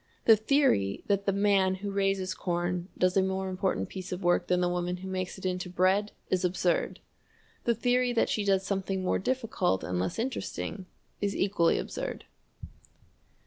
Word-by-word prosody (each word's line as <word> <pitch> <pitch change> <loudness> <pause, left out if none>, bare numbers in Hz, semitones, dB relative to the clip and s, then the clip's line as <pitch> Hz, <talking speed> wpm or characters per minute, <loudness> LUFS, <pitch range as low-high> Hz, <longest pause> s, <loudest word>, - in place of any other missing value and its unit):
The 225 - +8
theory 215 - +2
that 200 -1 0
the - - +4
man 195 -1 +3
who 200 +1 -5
raises 195 -1 0
corn 175 0 -2
does 185 0 +2
a 195 - +5
more 190 0 -1
important 185 0 -1
piece 185 -1 -7
of 180 +1 -4
work 175 0 +2
than 180 0 +2
the 180 - +2
woman 180 0 -1
who 190 +1 -8
makes 185 0 -3
it 190 - -9
into 180 0 -2
bread 190 +4 +2 0.2
is 185 -1 +1
absurd. 180 -1 0 0.7
The 235 - +3
theory 245 +2 +2
that 235 - +2
she 210 - 0
does 195 -1 +2
something 195 -1 -2
more 185 - +1
difficult 220 - 0
and 90 +3 -2
less 95 - -2
interesting 225 -5 -4 0.3
is 200 -1 0
equally 190 -4 +2
absurd. - - -5
190 Hz, 175 wpm, -29 LUFS, 180-200 Hz, 0.7 s, The